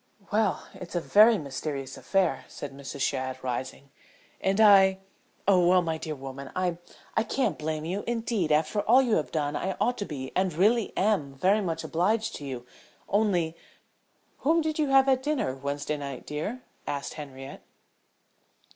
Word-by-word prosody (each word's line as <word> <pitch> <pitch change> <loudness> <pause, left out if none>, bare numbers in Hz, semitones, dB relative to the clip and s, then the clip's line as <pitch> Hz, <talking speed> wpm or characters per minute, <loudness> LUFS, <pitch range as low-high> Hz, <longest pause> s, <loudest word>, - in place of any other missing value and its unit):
"Well 210 -1 +1
it's 180 -1 -9
a - - +2
very 215 +6 +6
mysterious 140 -2 -5
affair," 190 -3 0
said 140 -2 -8
Mrs. 140 0 -7
Shadd, 130 -1 -1
rising, 130 +2 -4 0.5
"and 195 +2 0
I 195 -3 +7 0.5
oh, 180 -3 +5
well, 180 0 +5
my 160 -1 -2
dear 155 -1 -4
woman, 135 0 -8
I 180 -2 -1 0.4
I - - +3
can't 225 - 0
blame 155 0 -3
you 190 +5 -3
indeed, 225 -8 -1
after 155 +7 +2
all 245 +6 +5
you 235 -4 +2
have 155 - -2
done 145 -2 -1
I 190 0 -2
ought 245 0 +1
to 205 - -2
be 130 -5 -6
and 185 0 +2
really 210 +7 +3
am 185 -9 +1
very 195 +9 +3
much 165 -4 -2
obliged 210 +7 0
to 145 - -8
you. 125 -3 -6 0.4
Only 185 -6 +1 0.4
" - - -41
"Whom 325 +4 +3
did 315 0 -2
you 300 - +2
have 270 0 +5
at 260 -1 +3
dinner 275 - -1
Wednesday 140 +2 -3
night, 140 -2 -6
dear?" 205 +13 -4 0.2
asked 140 -1 -3
Henriette. 135 -2 -9
175 Hz, 170 wpm, -27 LUFS, 140-215 Hz, 0.5 s, I